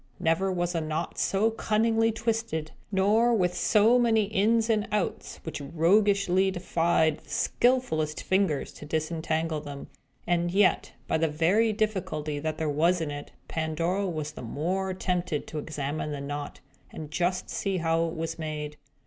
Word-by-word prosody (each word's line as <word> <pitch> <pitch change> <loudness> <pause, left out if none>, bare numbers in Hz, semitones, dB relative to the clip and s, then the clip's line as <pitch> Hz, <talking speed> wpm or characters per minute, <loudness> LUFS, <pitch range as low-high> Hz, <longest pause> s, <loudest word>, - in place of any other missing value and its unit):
Never 165 +4 +1
was 175 -1 -1
a 165 - 0
knot 155 +2 -3
so 210 +3 +2
cunningly 225 +1 +2
twisted, 225 -8 -2 0.2
nor 215 +5 +3
with 180 -4 +1
so 225 +3 +4
many 225 -3 +3
ins 220 +3 +2
and 215 -2 +1
outs, 210 -3 -2
which 160 -2 -5
roguishly 190 +4 +3
defied 170 -3 +1
the - - -22
skilfullest 200 -12 +1
fingers 190 -7 0
to 150 - -10
disentangle 160 0 -1
them. 140 -1 -8 0.4
And 175 0 +1
yet, 195 +2 +2
by - - +1
the 165 - +2
very 175 +9 +2
difficulty 185 -9 -2
that 155 +1 -3
there 160 - -1
was 165 +5 +2
in 160 -3 -2
it, 145 0 -7 0.2
Pandora 165 +5 -1
was 155 -4 -3
the - - -9
more 180 +10 -2
tempted 180 -5 -1
to 155 - -5
examine 150 0 -3
the 145 - -4
knot, 145 +1 -5 0.3
and 155 -1 -8
just 180 +3 -1
see 195 -2 -1
how 165 0 +1
it 165 - -5
was 165 0 -4
made. 150 -1 -4
170 Hz, 155 wpm, -27 LUFS, 155-200 Hz, 0.4 s, so